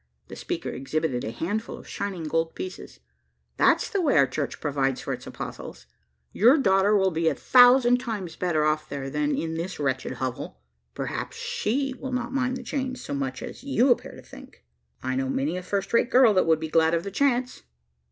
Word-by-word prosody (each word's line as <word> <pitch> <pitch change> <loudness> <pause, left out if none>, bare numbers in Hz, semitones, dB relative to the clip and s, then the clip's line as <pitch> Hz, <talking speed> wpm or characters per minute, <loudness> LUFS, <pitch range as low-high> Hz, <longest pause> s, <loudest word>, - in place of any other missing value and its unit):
The - - -8
speaker - - -4
exhibited 135 -1 -2
a - - -3
handful 205 - -3
of - - -13
shining 190 -4 -4
gold 165 +1 -1
pieces. 370 +1 -8 0.6
"That's - - +3
the 405 -4 -1
way 295 - +2
our 140 - +6
church 140 +1 -4
provides 135 -3 -1
for - - -4
its - - -8
apostles. - - -8 0.5
Your 245 +9 +5
daughter 200 -4 +3
will 190 -1 +2
be 165 0 0
a 155 - +2
thousand 245 - +6
times 210 -9 -5
better 165 -4 0
off 155 0 0
there, 135 -1 -5
than 150 0 0
in 160 0 -2
this 170 +2 -4
wretched 130 -2 -1
hovel. 125 - -5 0.4
Perhaps - - -4
she 270 +5 -1
will 265 - -5
not 250 0 -3
mind 255 -1 0
the 255 - -8
change 260 +1 -3
so - - -6
much 130 -2 -3
as - - -9
you 270 -2 +3
appear 240 - 0
to - - -13
think. - - -14 0.4
I 130 0 -1
know 130 0 -1
many 140 +5 -1
a 185 - -3
first 195 +3 -3
rate 235 - +3
girl 255 -4 +6
that 185 -3 +2
would 160 -1 +4
be 160 - -4
glad 160 +1 +3
of 165 - -1
the 200 - -5
chance." 255 +2 0
180 Hz, 200 wpm, -25 LUFS, 150-245 Hz, 0.6 s, our